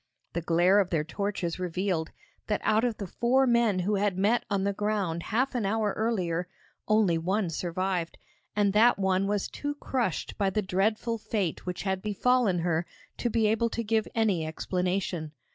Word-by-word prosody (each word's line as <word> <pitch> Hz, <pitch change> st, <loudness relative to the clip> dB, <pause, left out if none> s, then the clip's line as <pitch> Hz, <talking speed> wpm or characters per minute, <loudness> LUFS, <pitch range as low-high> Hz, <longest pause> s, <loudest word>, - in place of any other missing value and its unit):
The 170 Hz, -, -1 dB
glare 175 Hz, +4 st, +4 dB
of 190 Hz, -3 st, +1 dB
their 160 Hz, -3 st, +1 dB
torches 185 Hz, 0 st, -3 dB
revealed 180 Hz, -2 st, -1 dB, 0.4 s
that 210 Hz, -, 0 dB
out 220 Hz, +1 st, +3 dB
of 240 Hz, -3 st, 0 dB
the 200 Hz, -, -4 dB
four 245 Hz, +8 st, +2 dB
men 235 Hz, -5 st, +3 dB
who 200 Hz, +3 st, +1 dB
had 200 Hz, -2 st, 0 dB
met 225 Hz, +5 st, +2 dB
on 200 Hz, -2 st, 0 dB
the 200 Hz, 0 st, 0 dB
ground 195 Hz, -5 st, -1 dB
half 245 Hz, +9 st, 0 dB
an 245 Hz, -3 st, -1 dB
hour 210 Hz, 0 st, 0 dB
earlier 180 Hz, -6 st, -1 dB, 0.4 s
only 215 Hz, -6 st, +3 dB
one 185 Hz, +2 st, 0 dB
survived, 175 Hz, +1 st, -2 dB, 0.4 s
and 205 Hz, -1 st, +2 dB
that 225 Hz, +2 st, +5 dB
one 190 Hz, 0 st, +1 dB
was 205 Hz, -1 st, 0 dB
too 290 Hz, 0 st, -4 dB
crushed 240 Hz, -, -2 dB
by 200 Hz, -1 st, +2 dB
the 210 Hz, +2 st, -1 dB
dreadful 215 Hz, +5 st, 0 dB
fate 205 Hz, -6 st, -2 dB
which 180 Hz, -, -3 dB
had 190 Hz, -1 st, -1 dB
befallen 215 Hz, -1 st, +2 dB
her 165 Hz, -1 st, +1 dB, 0.3 s
to 240 Hz, -, -1 dB
be 225 Hz, -1 st, +1 dB
able 225 Hz, +2 st, +2 dB
to 230 Hz, -, -3 dB
give 220 Hz, 0 st, +1 dB
any 210 Hz, -7 st, +2 dB
explanation. 180 Hz, 0 st, -2 dB
200 Hz, 180 wpm, -28 LUFS, 180-220 Hz, 0.4 s, that